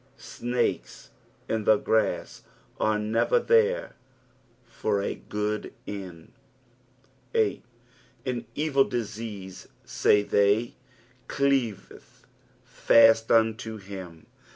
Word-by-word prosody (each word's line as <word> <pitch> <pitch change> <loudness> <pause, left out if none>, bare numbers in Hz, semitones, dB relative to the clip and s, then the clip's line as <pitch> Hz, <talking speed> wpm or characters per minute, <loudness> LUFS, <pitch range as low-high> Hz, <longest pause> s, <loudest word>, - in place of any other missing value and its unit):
Snakes 120 0 -3 0.4
in 110 -2 -2
the 110 - +6
grass 110 +1 -1 0.4
are 110 0 +1
never 110 - +1
there 470 +1 +2 0.7
for 110 -3 -2
a 100 - -2
good 105 0 -4
end. 90 -5 -8 1.0
8. 445 -2 +1 0.6
"^n 125 -2 -3
eeil 140 -3 +2
duerut, 105 -5 -6 0.4
»ay 105 0 +6
theff, 100 +4 +2 0.6
cleaveCh/att 115 -2 +1
unta 110 0 +1
him." 95 -5 -10
110 Hz, 80 wpm, -26 LUFS, 100-120 Hz, 1.0 s, the